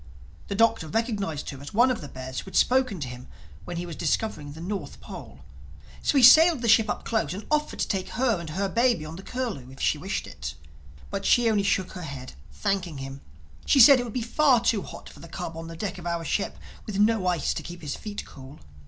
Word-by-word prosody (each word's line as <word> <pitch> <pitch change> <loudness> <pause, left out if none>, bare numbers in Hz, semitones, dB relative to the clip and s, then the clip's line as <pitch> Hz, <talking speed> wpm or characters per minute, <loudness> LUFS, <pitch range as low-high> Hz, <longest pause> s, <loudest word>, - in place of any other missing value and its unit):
The 200 - -3
Doctor 225 -5 +3
recognized 200 - -2
her 135 -1 -10
as 145 - -9
one 245 +3 +5
of 240 - -3
the 145 - -7
bears 130 -1 -6
who - - -8
had 190 - -10
spoken 255 -7 +3
to 135 - -3
him 125 0 -9 0.4
when 175 - -5
he 175 - -3
was 170 -2 -7
discovering 150 -10 -2
the 160 - -11
North 190 +4 -5
Pole. - - -10 0.6
So 290 - +1
he 265 - +5
sailed 315 +1 +8
the - - +1
ship 225 0 +5
up - - -3
close 185 -8 -1
and 205 - -7
offered 300 0 0
to - - 0
take 190 -1 -2
her 240 -6 +1
and 170 -2 -7
her 195 +6 -1
baby 230 -6 +2
on 155 +1 -7
to - - -8
the - - -14
Curlew 230 - -4
if 135 - -13
she - - +1
wished - - -3
it. - - -7 0.6
But 200 0 -3
she 240 +3 +4
only 210 -2 +2
shook 195 -2 0
her 180 - -8
head, 140 -5 -7 0.2
thanking 190 -6 -2
him; 135 0 -7 0.5
she 275 - +5
said 270 +2 +9
it - - -1
would 240 - -6
be 250 - -2
far 260 +1 +4
too 225 -3 +1
hot - - -10
for - - -13
the 170 - -11
cub 165 0 -6
on 165 0 -7
the 165 0 -8
deck 195 0 -4
of 175 - -7
our 170 -1 -2
ship, 200 +6 -1 0.3
with 205 -2 -4
no 210 -2 +3
ice 175 -5 +1
to - - -4
keep 175 -1 -9
his 145 - -3
feet 210 -1 -6
cool. 135 +2 -12
195 Hz, 245 wpm, -26 LUFS, 160-230 Hz, 0.6 s, said